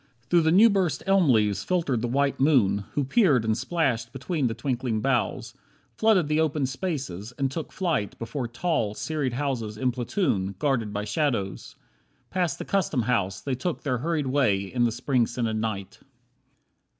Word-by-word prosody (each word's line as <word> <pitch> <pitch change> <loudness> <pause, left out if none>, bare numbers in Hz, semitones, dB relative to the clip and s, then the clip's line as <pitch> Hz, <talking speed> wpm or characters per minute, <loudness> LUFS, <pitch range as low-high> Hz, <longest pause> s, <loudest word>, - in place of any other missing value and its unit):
Through 165 -2 +4
new 195 +8 +7
burst 195 -6 0
elm 195 -5 +4
leaves 105 -4 +2
filtered 165 -10 0
the 120 - -1
white 140 +3 0
moon, 105 -9 +3
Who 145 - 0
peered 140 - +3
and 110 0 +2
splashed 125 -10 -1
between 135 +2 -1
the 115 - -3
twinkling 120 -2 -2
boughs, 120 -1 -1 0.4
Flooded 215 -8 +3
the 150 +1 +1
open 155 -3 +1
spaces, 130 - -4
and 135 -2 0
took 160 +3 -5
flight 165 - -1
Before 120 +2 -4
tall, 120 -4 -1
serried 130 +3 -2
houses 120 -6 -2
in 130 +2 +1
platoon, 120 - -1
Guarded 120 -5 0
by 105 0 -3
shadows. 115 - -2 0.6
Past 180 -3 0
the - - -6
Custom 165 -10 0
House 100 -6 0
They 135 - -2
took 160 +8 -3
their 130 -5 -1
hurried 155 +1 -1
way 130 -8 +2
in 120 +5 0
the 115 - +1
Spring 120 0 +1
scented 115 -2 -2
night. 110 -3 -4
130 Hz, 165 wpm, -26 LUFS, 115-155 Hz, 0.6 s, new